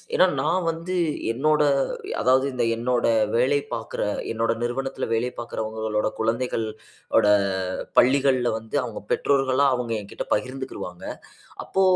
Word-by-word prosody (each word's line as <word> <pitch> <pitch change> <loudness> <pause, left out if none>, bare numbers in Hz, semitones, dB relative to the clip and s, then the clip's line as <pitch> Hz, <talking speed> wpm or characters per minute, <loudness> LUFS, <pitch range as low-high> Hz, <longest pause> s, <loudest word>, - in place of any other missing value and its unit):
ஏன்னா 185 - +6
நான் 175 +4 +1
வந்து 165 +3 -3 0.4
என்னோட 150 +5 +2 0.6
அதாவது, 130 +1 +4 0.3
என்னோட 120 +1 0 0.3
வேலை 130 +4 +3 0.2
பாக்குற, 115 - -5 0.3
என்னோட 115 0 +1
நிறுவனத்துல 135 +3 -2
வேலை 120 +2 +1
பாக்குறவங்களோட 110 -2 -2
குழந்தைகள் 115 0 0 0.5
ஓட 105 - +5 0.7
பள்ளிகள்ல 130 -2 +4
வந்து, 110 +3 -7
அவுங்க 115 -4 -6
பெற்றோர்கள்லாம், 135 0 +3
அவங்க 125 -2 -3
எங்கிட்ட 100 - -7
பகிர்ந்துகிருவாங்க. 130 -6 -4 0.6
அப்போ 195 - 0
125 Hz, 110 wpm, -24 LUFS, 115-135 Hz, 0.7 s, ஏன்னா